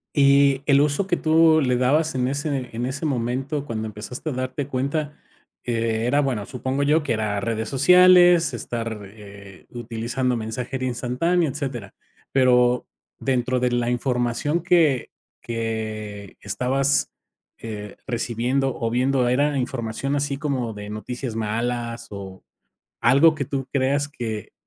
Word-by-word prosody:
Y 140 -1 +4
el 140 -1 +5
uso 150 +6 +1
que 175 - +1
tú 160 0 +4
le 125 -3 +1
dabas 145 +4 +2
en 125 0 +1
ese 140 -2 -2
en 120 +2 -2
ese 140 +4 -4
momento 135 +2 -2
cuando 110 -3 -4
empezaste 110 +8 -6
a - - -4
darte 130 +2 -3
cuenta, 145 +3 -2 0.5
eh, 115 -1 -1
era, 140 +3 +2
bueno, 120 -8 -1
supongo 130 +2 -2
yo 150 +2 +3
que 135 - 0
era 105 -2 -1
redes 110 +1 -2
sociales, 175 +2 +6
estar, 115 -3 -4
eh, 100 -2 -13
utilizando 120 +2 -2
mensajería 125 +4 -4
instantanea, 140 +8 0
etcétera. 130 -8 -5 0.4
Pero 125 -2 +3 0.3
dentro 125 -1 0
de 125 0 +1
la 120 0 0
información 125 +5 0
que 160 -8 +3 0.3
que 110 -3 -5
estabas, 135 +7 0 0.5
eh, 105 -2 -7
recibiendo 125 +3 -1
o 115 - -1
viendo 125 +1 +1
era 145 +3 +2
información 125 +1 -2
así 140 -1 -1
como 130 -6 -2
de 105 0 -8
noticias 115 +3 -5
malas 115 +1 -2
o, 95 -2 -9 0.6
¿algo 155 +5 +5
que 140 -3 -3
tú 135 0 -4
creas 140 +1 +1
que 110 -7 -6
125 Hz, 140 wpm, -23 LUFS, 115-140 Hz, 0.6 s, sociales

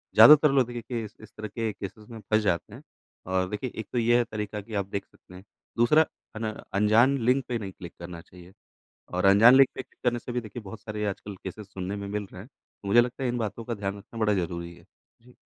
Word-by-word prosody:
ज़्यादातर 145 +7 +9
लोग 135 -3 +3
देखिए 120 -1 -6
कि 115 -1 -4 0.2
इस 110 - -13
तरह 110 - -5
के 115 0 -3
केसेज़ 105 +3 -8
में 115 - -8
फंस 110 +1 +1
जाते 85 -4 -1
हैं। - - -11 0.4
और 95 0 0
देखिए 110 +5 -4
एक 110 - -5
तो - - -2
ये 120 0 +4
है 120 - +3
तरीका 105 -1 -5
कि 110 +3 -12
आप 100 -1 0
देख 100 0 -4
सकते - - -21
हैं। 90 +1 -11 0.3
दूसरा 150 +7 +5 0.3
अन 110 +1 -3 0.3
अनजान 110 +7 +4
लिंक 130 +2 +3
पे 120 - -1
नहीं 100 -3 -6
क्लिक 90 -2 -11
करना 85 -1 -8
चाहिए 90 +1 -16 0.6
और 90 - 0
अनजान 105 +6 +8
लिंक 135 -1 +7
पे - - -5
क्लिक - - -31
करने 120 -1 +2
से 120 - -7
भी 125 - -1
देखिए 115 +1 -9
बहुत 105 +3 -9
सारे 105 -1 -4
आजकल 100 0 -5
केसेज़ 100 +3 -7
सुनने 95 +1 -5
में 100 0 -6
मिल 105 0 -3
रहे 90 - -9
हैं 115 - -14
तो 105 -5 -14
मुझे 120 +4 +7
लगता 125 +2 -2
है 130 - 0
इन 120 0 -1
बातों 110 0 -4
का 115 - -3
ध्यान 100 -1 -4
रखना 115 +3 -12
बड़ा 105 -1 +3
ज़रूरी 85 -2 -3
है। - - -18 0.4
जी। 125 +1 -19
110 Hz, 250 wpm, -27 LUFS, 100-120 Hz, 0.6 s, ज़्यादातर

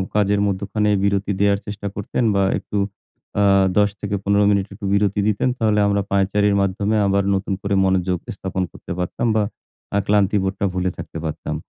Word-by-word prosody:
কাজের 105 -1 +2
মধ্যখানে 100 +2 -1
বিরতি 100 0 +1
দেওয়ার 100 0 +3
চেষ্টা 100 0 -5
করতেন 105 +4 -2
বা 100 - +3 0.2
একটু 105 - -5 0.6
আ - - +4 0.3
১০ 105 0 +5
থেকে 100 0 -2
১৫ 100 0 +3
মিনিট 100 -2 +1
একটু 100 +1 -8
বিরতি 100 0 +2
দিতেন 105 +4 +1
তাহলে 105 -2 +2
আমরা 100 0 +1
পায়চারির 100 +1 +2
মাধ্যমে 100 +2 0
আবার 100 0 +2
নতুন 95 +1 -2
করে 100 0 -2
মনোযোগ 95 -1 +1 0.2
স্থাপন 95 -1 -3
করতে - - -11
পারতাম 90 +6 -2
বা 110 - +3 0.5
আ - - +3
ক্লান্তি 105 0 +3
বোধটা 95 +1 -1
ভুলে 90 0 0
থাকতে - - -7
পারতাম।" 80 - -4
100 Hz, 175 wpm, -21 LUFS, 95-105 Hz, 0.6 s, ১০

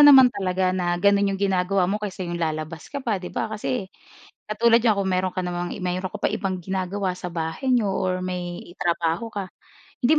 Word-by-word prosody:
naman 270 -4 +9
talaga 185 -1 0
na 175 -1 0
gano'n 200 +1 +4
'yong - - -1
ginagawa 190 -1 +2
mo 205 +4 -1
kaysa 190 -3 -4
'yong 170 0 -4
lalabas 155 0 -3
ka 280 -2 -5
pa 210 -6 0
'di 180 - -6
ba - - -2
kasi 215 0 -2 0.6
katulad 230 +2 +4
niyan, 220 -3 +3
kung 195 -1 0
meron 185 0 +1
ka 185 - 0
namang, 175 0 -2 0.2
meron 185 +1 -1
ka - - -4
pa - - +1
ibang 195 -3 -1
ginagawa 190 0 -1
sa 180 0 -6
bahay 165 +8 -3
n'yo 240 -5 +3
or 185 -1 -1
may 175 -1 -5
trabaho 170 +5 0
ka 200 -3 -5 0.5
hindi 280 - +5
185 Hz, 200 wpm, -24 LUFS, 180-205 Hz, 0.6 s, naman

